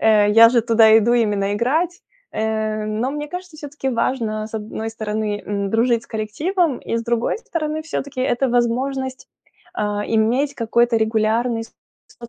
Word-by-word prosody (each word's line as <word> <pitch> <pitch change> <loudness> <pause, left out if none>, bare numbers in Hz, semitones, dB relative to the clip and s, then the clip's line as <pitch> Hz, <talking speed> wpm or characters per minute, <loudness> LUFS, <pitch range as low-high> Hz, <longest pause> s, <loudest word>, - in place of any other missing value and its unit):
Э, 210 -2 +4
я 225 +2 +8
же 240 -1 +3
туда 225 -1 +5
иду 235 +3 +2
именно 210 -4 +1
играть, 320 - 0 0.3
э. 215 -1 -1
Но 215 +5 -2
мне 295 +1 -4
кажется, 360 -1 -8
всё-таки 290 -2 -5
важно, 230 -3 -1
с 220 - -12
одной 220 +1 -4
стороны, 215 -1 -3
м, 200 -1 -2
дружить 230 +1 +2
с - - -17
коллективом, 290 - -1
и - - -3
с 230 - -2
другой 235 - 0
стороны, 315 -8 -3
всё-таки 280 -4 -5
это 260 +1 +1
возможность, 255 +2 -1 0.5
э, - - 0 0.3
иметь 245 +6 +1
какой-то 235 0 +2
регулярный 225 +2 +1
соц 235 +1 -17
235 Hz, 155 wpm, -20 LUFS, 220-270 Hz, 0.5 s, я